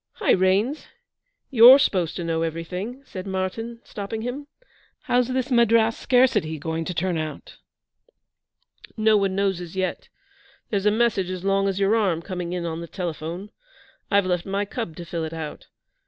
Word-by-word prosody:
'Hi, 420 - +1
Raines; 195 +10 +2 0.6
you're 250 +1 +10
supposed 185 - +1
to 175 - -4
know 165 -1 -1
everything,' 180 - -4
said 190 -6 -7
Martyn, 195 +5 -4
stopping 220 +2 -6
him. 270 +4 -5 0.6
'How's 245 -1 +2
this 260 +1 -2
Madras 230 -2 +4
"scarcity" 220 -11 +2
going 160 +2 -3
to 180 - -3
turn 175 -1 0
out?' 155 -1 -7 1.4
'No 220 0 +4
one 195 -2 +1
knows 195 -2 0
as 175 0 -9
yet. 185 -1 -3 0.6
There's 200 -1 +1
a - - +5
message 215 -4 +1
as 185 -1 -5
long 195 0 +2
as 195 0 -1
your 200 +2 +3
arm 185 -7 +1
coming 180 -2 -5
in 180 -1 -3
on 165 0 -4
the 170 - -7
telephone. 175 +3 -5 0.6
I've 200 -1 +3
left 180 -2 0
my 200 +1 -2
cub 205 -6 -5
to 175 - -8
fill 165 -1 -4
it 160 0 -5
out. 160 -2 -7
195 Hz, 170 wpm, -24 LUFS, 170-225 Hz, 1.4 s, you're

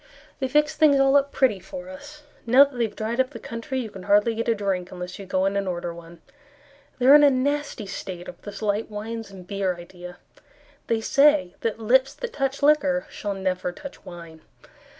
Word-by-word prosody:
They 265 - -1
fixed 300 +3 +1
things 290 -3 +5
all 270 0 +4
up 280 0 +3
pretty 240 -8 +2
for 270 +7 -9
us; 290 +2 -11 0.2
Now 255 +4 +8
that 280 -2 -4
they 240 -1 +1
have 210 - -8
dried 225 +3 -3
up 260 0 +2
the 235 - -10
country, 255 +4 -4
You 220 -3 -7
can 190 - -10
hardly 210 +3 +4
get 230 +1 -3
a 230 - +2
drink 190 -3 -2
unless 180 0 -7
you 195 - -9
go 185 +1 0
in 195 +1 0
and 200 -1 -1
order 175 -1 -3
one. 170 0 -13 0.7
They 250 - -1
are 270 - +9
in 295 - +9
a 290 - +8
nasty 280 -3 -1
state 185 -2 -7
over 175 - -10
this 205 +1 -8
light 210 +2 -1
wines 220 +1 -6
and 190 -2 -12
beer 195 -1 -2
idea; 175 +1 -11 0.7
They 225 -1 0
say 280 -6 +3
that 225 -2 -1
lips 260 +4 +2
that - - -6
touch 275 0 -2
liquor 285 -2 +3
Shall 205 -1 -4
never 185 -2 -2
touch 280 +10 -11
wine. 170 -2 -11
225 Hz, 210 wpm, -24 LUFS, 190-275 Hz, 0.7 s, are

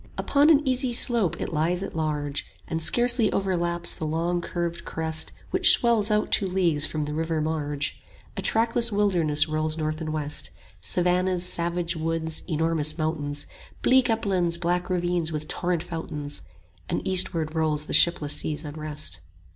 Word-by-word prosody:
Upon 290 +2 +3
an 300 -2 +4
easy 255 0 +1
slope 235 - +4
it - - -4
lies 170 +4 0
at - - -7
large 150 -3 -2 0.2
And 160 -1 -3
scarcely 240 +4 +3
overlaps 175 -3 +1
the 155 - -4
long 170 +3 -1
curved 170 0 -4
crest 160 0 -2
30 - - -22
Which - - +7
swells 230 -3 +2
out 210 0 +1
two 195 - +2
leagues 170 -5 +1
from 155 -1 -3
the 150 - -5
river 160 +1 -1
marge. 150 -2 -2 0.3
A - - -3
trackless 230 +1 +2
wilderness 170 -7 +2
rolls 155 0 0
north 155 0 -3
and 155 -1 -3
west, 150 -1 -2 0.3
Savannahs, 180 0 +1
savage 170 0 -1
woods, 160 0 -2
enormous 160 -2 0
mountains, 145 -3 -2 0.4
Bleak 260 -1 +4
uplands, 185 -6 +1
black 175 +1 -1
ravines 175 -2 0
with 155 -1 -4
torrent 175 -1 -1
fountains; 150 - -5 0.5
And - - -2
eastward 170 -4 0
rolls 155 -2 0
the - - -6
shipless 155 -4 +4
sea's 155 +1 -3
unrest. 150 - -5
165 Hz, 155 wpm, -25 LUFS, 155-185 Hz, 0.5 s, Which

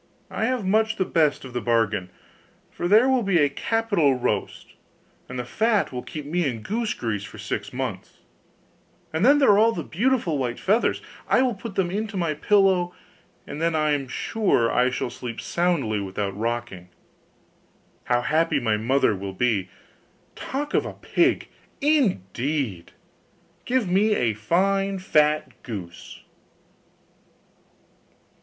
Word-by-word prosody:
I 220 - -1
have 250 -4 -1
much 220 +3 +2
the 190 - 0
best 155 -6 +1
of 130 - -10
the 120 - -2
bargain. 110 -5 +1 0.6
First 175 - -3
there 220 +6 +6
will 260 -2 +3
be 195 -4 +2
a 145 -3 +4
capital 200 - +1
roast; 120 -5 -3 0.5
then 125 - -7
the 125 - -3
fat 220 - +1
will 125 -1 -4
find 150 -2 -7
me 175 +4 0
in 120 -7 -3
goose 225 +2 -2
grease 105 -4 -3
for 105 - -10
six 105 +5 -4
months; 125 -8 -5 1.0
and 160 +3 0
then 280 +5 +6
there 275 -7 +5
are 200 - +5
all 225 +1 +4
the 170 - -4
beautiful 200 - 0
white 120 -2 -2
feathers. 215 +5 +1 0.2
I 255 - +4
will 250 -2 +1
put 200 0 -8
them 180 -2 0
into 210 +1 -3
my 170 -4 0
pillow, 185 +1 +2 0.5
and 150 - -7
then 165 0 +1
I 155 -1 +2
am 140 -2 -1
sure 130 - +1
I 125 +1 +3
shall 125 -1 -3
sleep 120 -1 -7
soundly 155 -12 0
without 100 0 -3
rocking. 115 -5 -4 1.2
How 120 0 +2
happy 160 -1 +2
my 110 -4 +1
mother 120 0 +2
will 95 0 -6
be! 100 -3 0 0.7
Talk 290 +3 -4
of - - +3
a - - -6
pig, - - +1 0.3
indeed! 145 - 0 0.7
Give 250 -4 +1
me 205 +4 +3
a 115 - +1
fine 195 - +1
fat 150 -4 +1
goose. 95 -7 -8
155 Hz, 150 wpm, -24 LUFS, -, 1.2 s, there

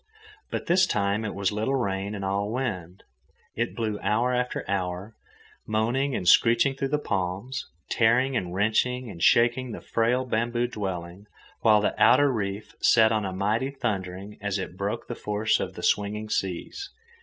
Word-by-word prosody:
But - - -4
this 185 +2 +4
time 100 - 0
it 110 - -4
was 100 -1 0
little 110 +6 -1
rain 100 -4 -2
and 100 -1 -4
all 100 +2 -1
wind. 95 -9 -4 0.5
It 115 +1 -2
blew 110 -3 -2
hour 120 +4 +1
after 125 0 -1
hour, 95 +2 -3 0.5
moaning 120 +5 0
and 90 - -3
screeching 115 +8 +5
through 135 0 -2
the 150 +2 +1
palms, 100 +2 -3 0.2
tearing 125 +3 +2
and 90 -6 -2
wrenching 110 +5 0
and 85 -3 -10
shaking 120 +3 +3
the - - -6
frail 120 +3 0
bamboo 120 0 0
dwelling, 95 -3 -5 0.3
while 110 -2 +5
the - - +1
outer 145 -1 +6
reef 100 -2 -4
set 110 -1 +5
up 110 -1 +1
a 95 - -3
mighty 105 +7 0
thundering 100 -6 -4
as 100 -1 -1
it 95 -2 -5
broke 100 +4 -3
the - - -4
force 105 -1 0
of - - -4
the - - -8
swinging 105 +1 0
seas. 95 - -3
110 Hz, 165 wpm, -26 LUFS, 100-120 Hz, 0.5 s, outer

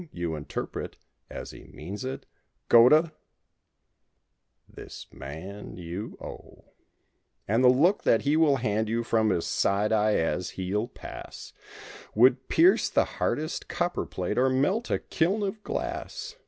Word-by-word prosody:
you 85 -2 -3
interpret, 75 -1 -5 0.3
as - - -7
he - - -13
means 95 +10 -8
it: 130 +1 -5 0.4
"Go 120 +1 +8
to 155 +2 +4 0.8
!" - - -51
This - - -10
man 85 +11 -8
you 90 +4 -6
owe. - - -11 0.8
And 115 +5 +2
the - - +7
look 160 +11 +4
that 115 - +3
he 145 +2 +2
will 155 -3 +4
hand 110 -3 -1
you 115 +1 0
from 110 -2 +2
his 85 -4 0
side 100 +2 +1
eye 110 -1 +3
as 80 +2 0
he'll 100 +4 -1
pass - - -10 0.6
Would 130 +3 +4
pierce 355 +3 +4
the - - +2
hardest 155 +2 -3
copper 175 0 -2
plate 90 +6 -2
or 130 +1 +4
melt 165 - +1
a - - +2
kiln 190 +6 0
of 205 +2 -3
glass. - - -5
115 Hz, 145 wpm, -27 LUFS, 100-150 Hz, 0.8 s, Go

